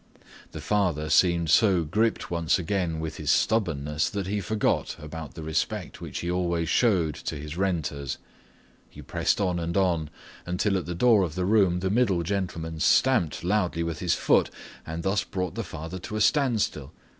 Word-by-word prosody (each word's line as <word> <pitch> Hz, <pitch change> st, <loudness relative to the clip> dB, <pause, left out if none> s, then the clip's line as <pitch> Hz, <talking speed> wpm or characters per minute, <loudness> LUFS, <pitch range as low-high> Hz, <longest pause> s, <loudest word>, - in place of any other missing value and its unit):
The -, -, -7 dB
father 85 Hz, -8 st, 0 dB
seemed 85 Hz, -1 st, +3 dB
so 95 Hz, -7 st, +4 dB
gripped 105 Hz, +9 st, 0 dB
once 85 Hz, 0 st, +1 dB
again 90 Hz, -2 st, -1 dB
with 80 Hz, -1 st, -5 dB
his -, -, -4 dB
stubbornness 75 Hz, -9 st, +1 dB
that 100 Hz, -2 st, -3 dB
he 100 Hz, +2 st, -2 dB
forgot 105 Hz, +4 st, 0 dB
about 75 Hz, -2 st, -8 dB
the 80 Hz, -, -7 dB
respect 80 Hz, 0 st, -3 dB
which -, -, -5 dB
he 85 Hz, -, -2 dB
always 85 Hz, -3 st, 0 dB
owed 90 Hz, -10 st, +2 dB
to -, -, -5 dB
his 75 Hz, +1 st, -7 dB
renters. 80 Hz, -7 st, -2 dB, 0.7 s
He -, -, -12 dB
pressed -, -, 0 dB
on 90 Hz, -3 st, 0 dB
and 85 Hz, +1 st, -2 dB
on, 85 Hz, -5 st, +1 dB, 0.3 s
until 90 Hz, +3 st, 0 dB
at 90 Hz, -5 st, -2 dB
the 85 Hz, -, -3 dB
door 110 Hz, +2 st, +5 dB
of 85 Hz, -4 st, -2 dB
the 90 Hz, -1 st, -1 dB
room 95 Hz, -4 st, +3 dB
the 95 Hz, 0 st, 0 dB
middle 100 Hz, -7 st, +2 dB
gentleman 80 Hz, -3 st, -3 dB
stamped 90 Hz, -, +3 dB
loudly 90 Hz, -3 st, 0 dB
with 85 Hz, -1 st, -4 dB
his 90 Hz, -2 st, +1 dB
foot -, -, +3 dB, 0.4 s
and 80 Hz, +1 st, -5 dB
thus 95 Hz, +1 st, +1 dB
brought 90 Hz, -2 st, -3 dB
the -, -, -3 dB
father 80 Hz, +3 st, -7 dB
to 105 Hz, -, -7 dB
a 110 Hz, -, -1 dB
standstill. 110 Hz, -, +1 dB
90 Hz, 180 wpm, -26 LUFS, 80-100 Hz, 0.7 s, door